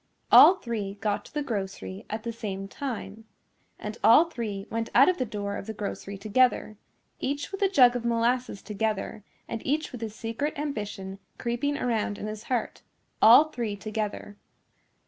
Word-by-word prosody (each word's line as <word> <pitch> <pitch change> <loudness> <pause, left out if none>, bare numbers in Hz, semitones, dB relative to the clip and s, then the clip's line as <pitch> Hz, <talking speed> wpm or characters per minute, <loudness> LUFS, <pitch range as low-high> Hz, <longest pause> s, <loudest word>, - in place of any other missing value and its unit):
All 375 - +10
three 220 - -4
got 205 0 -2
to - - -15
the 295 - 0
grocery 195 -4 -5
at 215 +1 -4
the 235 - -4
same 195 -4 -5
time. 220 -3 -6 0.5
And 210 +2 -7
all 240 +9 +7
three 220 -11 -5
went 225 0 -2
out 270 +3 +8
of 365 - 0
the 255 - +1
door 205 -1 -4
of - - -8
the 220 - -5
grocery 200 -1 -5
together, 215 +1 +2 0.4
each 285 +5 -3
with 390 - -6
a 395 - +4
jug 250 -9 +6
of 245 - -2
molasses 235 -1 0
together 215 -1 -3 0.2
and 230 - -5
each 300 +3 -1
with 245 - -8
his 220 -1 -5
secret 230 +8 -3
ambition 205 -9 -5 0.2
creeping 255 +5 -1
around 220 -4 -1
in - - -6
his 215 0 -6
heart, 245 -3 -2 0.4
all 255 +8 +8
three 230 -6 -3
together. 210 0 -5
225 Hz, 170 wpm, -27 LUFS, 205-255 Hz, 0.5 s, All